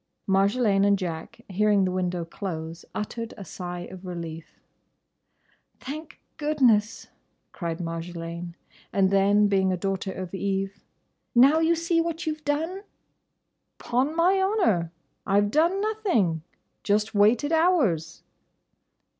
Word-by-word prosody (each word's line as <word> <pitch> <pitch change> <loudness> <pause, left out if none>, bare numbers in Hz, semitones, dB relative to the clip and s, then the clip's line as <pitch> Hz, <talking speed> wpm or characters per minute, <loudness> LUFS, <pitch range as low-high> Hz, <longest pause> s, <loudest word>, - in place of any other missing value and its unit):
Marjolaine 200 +1 +3
and 200 0 +4
Jack, 170 -4 -6
hearing 205 0 +2
the 185 - -1
window 180 -2 -2
close, 165 -2 -6
uttered 230 +2 -4
a 195 - -8
sigh 175 0 -6
of 185 0 -10
relief. 165 -3 -7 1.2
"Thank 305 +4 -8 0.2
goodness!" 255 -9 +2 0.4
cried 170 -3 -4
Marjolaine; 170 0 -5 0.4
and 195 -1 +2
then, 200 +1 +4
being 190 -2 +2
a 185 - 0
daughter 195 +1 -2
of 185 -1 -7
Eve, 195 0 -2 0.5
"Now 275 +6 +6
you 325 +1 +3
see 335 0 +1
what 335 0 -3
you 315 - 0
've 305 0 -15
done!" 320 +6 -1 1.0
"'Pon 260 +6 0
my 365 +3 +3
honour, 355 - +1 0.4
I 200 +1 +4
've 205 0 +1
done 335 - +3
nothing. 380 - 0 0.4
Just 210 +1 +1
waited 220 +8 +3
hours." 270 - +2
200 Hz, 125 wpm, -26 LUFS, 180-300 Hz, 1.2 s, Now